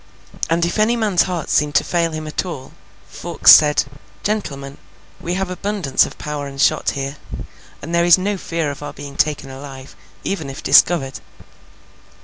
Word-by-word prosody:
And 170 +1 +2
if 175 - -2
any 220 +3 +3
man's 210 -6 +2
heart 180 -4 -2
seemed 150 -2 +1
to - - +4
fail 170 -1 0
him 155 0 -5
at 155 - -3
all, 155 -8 -8 0.4
Fawkes - - +4
said, 150 -1 +6 0.4
'Gentlemen, 140 -10 -4 0.4
we 175 +1 -3
have 190 -1 -2
abundance 190 -5 0
of - - -12
powder 150 -1 -5
and 135 0 -10
shot - - +2
here, 140 +1 -4 0.7
and 165 - -6
there 170 0 +3
is 175 +1 +6
no 200 +2 -1
fear 165 -5 -3
of 140 - -9
our 145 - -6
being 140 0 -9
taken 145 -2 -1
alive, 135 0 -10 0.3
even 160 -8 -3
if 135 +3 -8
discovered. 135 -6 +4
155 Hz, 170 wpm, -19 LUFS, 140-180 Hz, 0.7 s, said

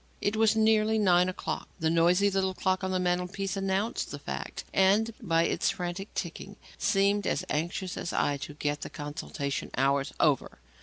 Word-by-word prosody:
It 205 - 0
was 220 0 +4
nearly 220 0 +3
nine 180 -3 +4
o'clock. 185 - -4
The 160 0 +1
noisy 175 +4 +4
little 190 -1 0
clock 185 0 0
on 190 - -1
the 185 - 0
mantelpiece 180 +2 -1
announced 195 +3 -1
the - - -5
fact, - - -6
and, 205 +4 +3
by 165 -1 +2
its - - +1
frantic 180 +3 -4
ticking, 190 +3 -5 0.2
seemed 200 0 +2
as - - 0
anxious 175 +4 -2
as 170 - -3
I 145 -1 +1
to 145 +1 -8
get 145 0 -2
the - - -5
consultation 145 -1 -4
hours 135 +1 +2
over. 145 -5 +2
185 Hz, 170 wpm, -29 LUFS, 165-200 Hz, 0.2 s, was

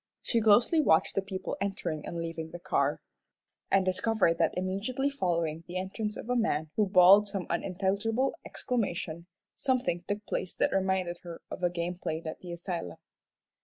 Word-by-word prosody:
She 230 - +1
closely 230 +9 +5
watched 160 - +3
the 195 - +1
people 190 -1 -5
entering 175 -6 -3
and 170 - -5
leaving 165 -1 -4
the 175 - -7
car, - - 0 0.7
and 195 -1 +3
discovered 185 -2 +2
that 165 +1 +2
immediately 210 +9 -1
following 170 - -1
the 180 +1 -4
entrance 210 +4 -3
of - - -7
a 250 - +1
man 160 -10 0
who 210 -2 +2
bawled 195 +2 +7
some 195 -3 -3
unintelligible 200 +8 0
exclamation, 175 -9 -3 0.3
something 255 -10 0
took 205 +1 -3
place 185 - -3
that - - +1
reminded 190 -2 0
her 170 -1 -8
of - - -6
a 175 - +3
game 175 +1 -3
played 160 0 -3
at 160 - -5
the 180 - -8
asylum. 170 - -5
185 Hz, 165 wpm, -30 LUFS, 170-210 Hz, 0.7 s, bawled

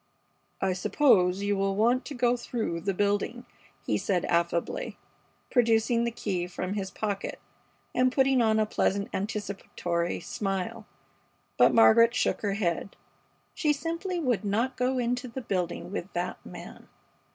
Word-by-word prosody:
"I 190 -1 +1
suppose 185 -2 +3
you 205 0 +1
will 195 0 0
want 240 +5 +2
to 290 - -6
go 245 0 +2
through 225 -8 -3
the 195 +2 -1
building," 205 +5 0 0.4
he - - 0
said, 180 -4 0
affably, 170 0 -1 0.5
producing 235 -1 +3
the - - +1
key 185 -6 -2
from 185 +1 -4
his 195 -2 -3
pocket 200 0 -4 0.5
and 255 0 +3
putting 265 -1 +3
on 220 -1 +3
a 215 - +3
pleasant 200 -1 0
anticipatory 195 -4 -2
smile, 205 +3 -3 0.7
but - - +6
Margaret 230 +1 +6
shook - - +1
her 205 -2 0
head. 195 -1 -2 0.6
She 300 -2 +2
simply 335 +5 -3
would 250 -9 0
not 225 +6 0
go 255 +1 0
into 245 +1 -1
the 240 +2 -6
building 180 -5 -3
with 195 -1 -5
that 175 +1 -3
man. - - -11
215 Hz, 145 wpm, -28 LUFS, 195-245 Hz, 0.7 s, but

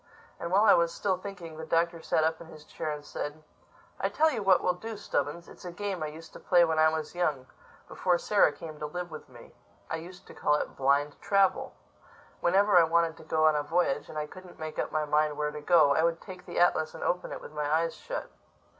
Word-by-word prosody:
And 170 - -4
while 200 +3 +5
I - - +7
was 170 0 +3
still 190 +1 0
thinking, 180 -5 -9
the 160 - -6
Doctor 165 0 +1
sat 160 - +1
up 160 +1 0
in 170 - -10
his 155 -2 -13
chair 160 - -5
and 150 -1 -5
said, 150 +2 -6 0.6
"I - - 0
tell 315 +1 +3
you 235 -6 -3
what 190 -2 +4
we'll 180 - +2
do, 220 +5 -7
Stubbins: 170 -2 -3
it's - - -14
a 180 - -6
game 195 -1 -4
I 155 - -1
used 160 +2 -11
to - - -10
play 175 -2 +4
when 160 -1 0
I 155 0 +6
was 155 0 -4
young—before 175 +2 -2
Sarah 200 -3 +3
came 155 0 -10
to 150 - -3
live 175 +2 -6
with 155 -3 -9
me. 120 -2 -15 0.4
I 160 - -1
used 180 +3 -11
to - - -13
call 150 - +1
it - - -3
Blind 140 +2 +1
Travel. 195 -2 +2 0.6
Whenever 195 +2 +4
I - - +6
wanted 165 0 +2
to - - -13
go 155 0 +1
on 155 -1 +5
a 150 - +1
voyage, 160 -1 0
and 155 - -7
I 150 - -1
couldn't 185 +3 -13
make 155 -1 -6
up - - -2
my 155 -1 0
mind 150 0 +1
where 150 0 -1
to 150 0 -7
go, 155 -3 +5
I 160 - +2
would 165 0 +1
take 185 -2 -11
the - - -6
atlas 160 -3 +2
and - - -7
open 180 - -1
it - - -5
with - - -11
my 150 -1 -2
eyes 165 +1 +1
shut. - - -6
165 Hz, 245 wpm, -29 LUFS, 150-180 Hz, 0.6 s, I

